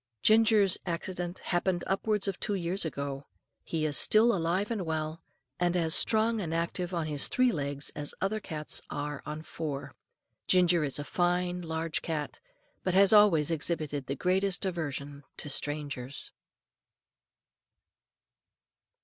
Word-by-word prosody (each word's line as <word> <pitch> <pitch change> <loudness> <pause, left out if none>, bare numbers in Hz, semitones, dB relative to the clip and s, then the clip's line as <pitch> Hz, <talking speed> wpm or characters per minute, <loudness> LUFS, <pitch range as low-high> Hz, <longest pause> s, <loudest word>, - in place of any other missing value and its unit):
Ginger's 215 -3 +5
accident 175 0 -4
happened 175 0 -1
upwards 205 +1 0
of 195 - -3
two 205 - -1
years 180 0 -1
ago. 140 -2 -4 0.4
He 160 -2 -2
is 150 -2 +1
still 230 +2 +5
alive 180 +5 -1
and 215 -5 -1
well, 160 0 -3 0.4
and 175 0 +1
as 165 -2 +2
strong 220 0 +4
and 165 -3 -3
active 170 +2 -2
on 170 -3 -1
his 150 -2 0
three 255 -1 +2
legs 140 -4 -3
as 145 0 -5
other 205 +3 -1
cats 155 -7 -4
are 145 0 -4
on 150 +1 -5
four. 145 -4 -5 0.5
Ginger 180 -3 +4
is 140 -2 0
a 145 - -4
fine, 180 +2 0
large 160 -1 -3
cat, 155 -3 -4 0.4
but 185 -1 0
has 195 +1 +6
always 175 -8 +5
exhibited 150 -3 -1
the 140 - -2
greatest 185 +4 +1
aversion 145 -5 -4
to 145 - -3
strangers. 140 -3 -3
170 Hz, 140 wpm, -29 LUFS, 150-190 Hz, 0.5 s, has